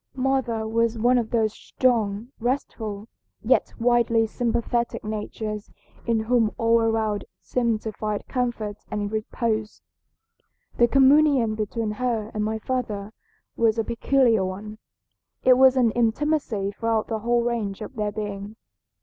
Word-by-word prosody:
"Mother 255 -4 0
was 230 +1 +1
one 245 +3 +3
of 225 -2 -3
those 220 -2 +1
strong, 225 -4 0
restful, 225 -4 -3 0.4
yet - - +2
widely 235 -1 +3
sympathetic 235 +1 -1
natures 215 0 -5 0.4
in 230 -1 +2
whom 225 -1 +1
all 230 0 +3
around 220 -2 0
seemed 235 -3 -1
to 220 - -3
find 210 0 -3
comfort 235 -5 -2
and 205 -1 -3
repose. 220 0 -2 0.9
The 240 - +5
communion 275 -3 +4
between 215 +1 -2
her 225 -1 -2
and 215 - -1
my 220 +1 -1
father 220 -4 -3 0.4
was 225 -1 +2
a 225 - +1
peculiar 235 -1 +2
one. 205 +3 -6 0.6
It 255 - +7
was 265 0 +6
an 240 -3 +4
intimacy 235 -3 0
throughout 225 +1 -1
the 220 -1 -3
whole 235 +2 +1
range 225 -5 -2
of - - -9
their 210 -2 -1
being. 205 0 -5
225 Hz, 135 wpm, -24 LUFS, 215-240 Hz, 0.9 s, It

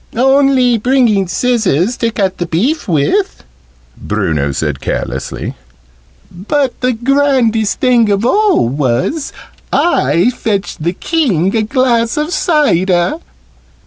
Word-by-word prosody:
"Only 265 -1 +3
bringing 230 -5 +2
scissors 220 - 0
to 230 - 0
cut 195 -4 -2
the 175 - -2
beef 235 - -1
with," 180 - 0 0.5
Bruno 70 -3 -2
said 70 0 -3
carelessly. - - -4 0.8
"But 255 - -2
the 255 0 +1
grandest 240 -4 +1
thing 245 -4 +3
of 200 +2 0
all 405 - +2
was, 135 - -1 0.4
I 245 - +2
fetched 205 -8 -3
the 170 +3 -1
King 200 - 0
a 225 - +2
glass 235 +1 0
of 305 +4 -2
cider!" 195 - +1
230 Hz, 110 wpm, -14 LUFS, 180-270 Hz, 0.8 s, Only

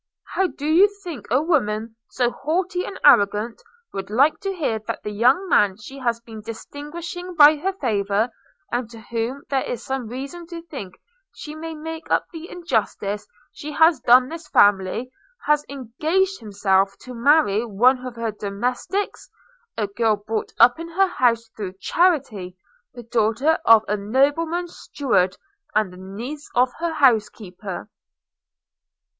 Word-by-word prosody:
How 380 - +2
do 295 -4 -8
you 345 +7 +5
think 340 -8 -7
a 260 +6 +2
woman 225 -9 0
so 245 -1 0
haughty 355 +6 -2
and 390 - -7
arrogant 210 +3 +4 0.3
would 195 0 -5
like 275 +8 +3
to 390 - -3
hear 295 - -1
that - - -4
the 210 - -4
young 255 - +3
man 205 - +3
she 265 +6 -10
has 235 -3 0
been 225 -2 -11
distinguishing 325 - -7
by 300 0 +8
her 380 +6 -1
favour, 215 - 0 0.4
and 240 -1 -2
to 230 -1 -11
whom 235 +5 -4
there 270 -1 +2
is 240 -2 -5
some 265 -3 -3
reason 275 +8 -7
to 335 -1 -8
think 265 - -9 0.4
she 300 - -8
may 320 +1 -7
make 320 +1 -7
up - - +2
the 330 +1 -9
injustice 210 - -2 0.2
she 300 +1 -8
has 320 -1 +5
done 250 +2 +5
this 330 +2 -8
family, 205 +1 +3 0.3
has 300 0 +3
engaged 310 - -1
himself 195 -2 +1
to 255 - -9
marry 235 -4 +3
one 245 +4 +3
of 250 -2 -6
her 230 -1 -2
domestics; 245 - -3 0.5
a 215 - +1
girl 215 +2 +1
brought 210 +1 -4
up 245 +5 +6
in 335 - -6
her 380 +3 +2
house 230 -7 +1
through 195 -4 -5
charity, 250 - +1 0.4
the 240 - -9
daughter 230 +7 +1
of 225 -1 +7
a 210 - +1
nobleman's 290 - 0
steward, 195 -10 0 0.4
and 210 -4 +1
the - - -12
niece 230 +11 -7
of 250 +1 +3
her 335 -1 -1
housekeeper?' 210 - 0
250 Hz, 155 wpm, -22 LUFS, 215-315 Hz, 0.5 s, by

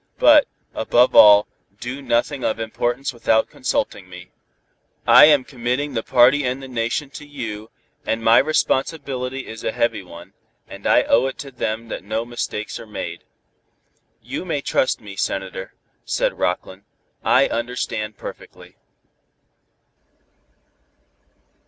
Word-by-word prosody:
But, - - +6 0.3
above 125 +1 +2
all, 105 0 +8 0.3
do 130 +3 -6
nothing 130 +1 -1
of 110 - -1
importance 120 +4 -2
without 110 -2 +1
consulting 90 - -3
me. 90 0 -12 0.7
"I - - +9
am 145 -3 +5
committing 130 +3 -3
the 115 - -1
party 130 +4 +4
and 125 +1 -2
the - - -7
Nation 125 +3 -3
to 150 - -9
you, 115 -7 -7 0.3
and 115 0 -2
my 115 +1 +6
responsibility 135 -3 -1
is 110 0 -9
a - - -1
heavy 115 -3 -1
one, 85 -2 -13 0.3
and - - -7
I - - +4
owe 120 +3 +3
it 135 - -6
to 140 -1 -8
them 115 -2 -4
that - - -6
no 110 +3 -3
mistakes 120 -3 -5
are - - -11
made." 85 -5 -7 1.0
"You - - -5
may 165 -6 -2
trust 130 - 0
me, 100 -2 -10
Senator," 95 -1 -4 0.3
said - - -1
Rockland. 95 +1 -2 0.4
"I - - +4
understand 115 -3 -3
perfectly." - - -11
120 Hz, 135 wpm, -21 LUFS, 110-135 Hz, 1.0 s, I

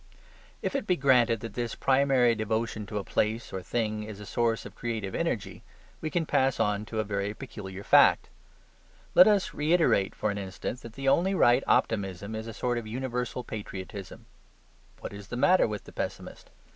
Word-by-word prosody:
If - - -2
it 270 -6 -2
be 180 - +3
granted 125 -6 +3
that 115 - -7
this 120 -2 -3
primary 135 -3 +3
devotion 110 -1 -2
to 105 - -4
a 100 - -2
place 110 +4 -1
or 95 - -3
thing 110 +1 -2
is 105 -1 -8
a 105 - -8
source 115 +1 0
of - - -9
creative 110 -5 -4
energy, - - -2 0.4
we 155 - -2
can 170 0 0
pass 135 -3 +1
on 105 0 +1
to 110 0 -4
a - - +2
very 100 0 -3
peculiar 100 -7 -8
fact. - - +5 0.9
Let 180 - +8
us 205 -3 +2
reiterate 150 - +2
for 105 - -1
an 100 - -4
instant 95 +6 -5
that 115 - -10
the 135 +2 -5
only 185 +8 +3
right 120 -6 +4
optimism 100 -1 0
is 110 +1 -5
a - - -5
sort 120 -1 -1
of 110 - -8
universal 125 +1 -3
patriotism. 100 -3 -7 0.8
What - - -6
is 100 0 -9
the 120 - -5
matter 180 +6 +4
with 105 -2 -5
the - - -14
pessimist? - - -6
115 Hz, 185 wpm, -28 LUFS, 105-130 Hz, 0.9 s, Let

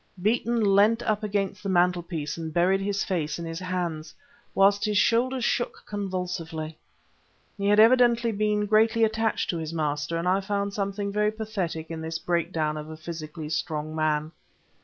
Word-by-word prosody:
Beeton 230 +3 +1
leant 220 +4 +4
up 215 0 0
against 205 -1 -2
the 200 - -4
mantelpiece 175 -4 0
and 160 -1 -5
buried 180 +4 +2
his 200 0 -1
face 155 -5 -2
in 170 - -5
his 165 +1 -5
hands, 175 -4 -3 0.4
whilst 200 +1 +4
his 210 -2 +1
shoulders 240 +4 +2
shook 240 - -1
convulsively. 180 -5 -4 0.8
He 200 -1 -2
had 205 +1 +5
evidently 235 0 +5
been 210 0 0
greatly 220 +2 +3
attached 220 0 +1
to 170 - -3
his 160 0 -5
master, 150 +1 -1
and 170 +2 -2
I 190 +2 +3
found 200 0 -2
something 200 0 -2
very 210 +1 +1
pathetic 195 -7 -4
in 160 -1 -5
this 160 0 -3
breakdown 165 -2 -1
of 150 0 -7
a 160 - -8
physically 155 -1 -7
strong 155 -1 -3
man. 155 0 0
185 Hz, 165 wpm, -26 LUFS, 160-210 Hz, 0.8 s, had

